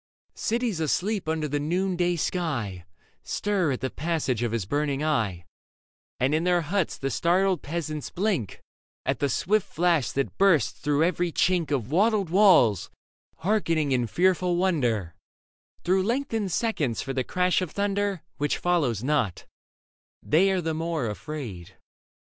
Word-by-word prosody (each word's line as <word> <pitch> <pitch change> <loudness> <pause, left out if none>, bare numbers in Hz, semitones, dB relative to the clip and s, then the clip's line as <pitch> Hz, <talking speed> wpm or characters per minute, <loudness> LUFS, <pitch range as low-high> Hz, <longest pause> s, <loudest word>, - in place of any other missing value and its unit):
Cities 230 -5 -1
asleep 185 +5 -1
under 160 -1 -1
the 145 0 -1
noonday 175 +3 0
sky 130 - -2 0.4
Stir 195 -7 0
at 125 - -5
the 130 - -2
passage 150 -7 -1
of 120 -2 0
his 115 -5 -2
burning 145 +4 -1
eye; 110 - -1 0.7
And 130 +3 +2
in 160 +2 +1
their 180 -1 +3
huts 170 +2 -1
the 135 0 -3
startled 185 +2 +2
peasants 155 -1 -4
blink 180 - -2 0.4
At 135 -3 0
the 140 - +1
swift 195 - +1
flash 170 -5 +1
that 140 0 -2
bursts 165 - +4
through 145 +1 +1
every 175 0 0
chink 175 -2 +1
Of 130 -4 -2
wattled 200 0 +2
walls, 175 - +5 0.6
hearkening 165 -8 +1
in 125 -2 +1
fearful 180 - +2
wonder 125 - 0 0.7
Through 185 +2 +2
lengthened 225 -2 -1
seconds 160 - -1
for 135 - -4
the 130 -1 0
crash 180 +6 +1
of 180 - -2
thunder 200 -2 -1
— - - -50
Which 145 0 0
follows 145 - 0
not: 135 -10 0 0.8
they 180 +6 +3
are 190 -1 +1
the 160 -1 -2
more 160 -3 -2
afraid. 105 - -7
160 Hz, 145 wpm, -26 LUFS, 135-185 Hz, 0.8 s, walls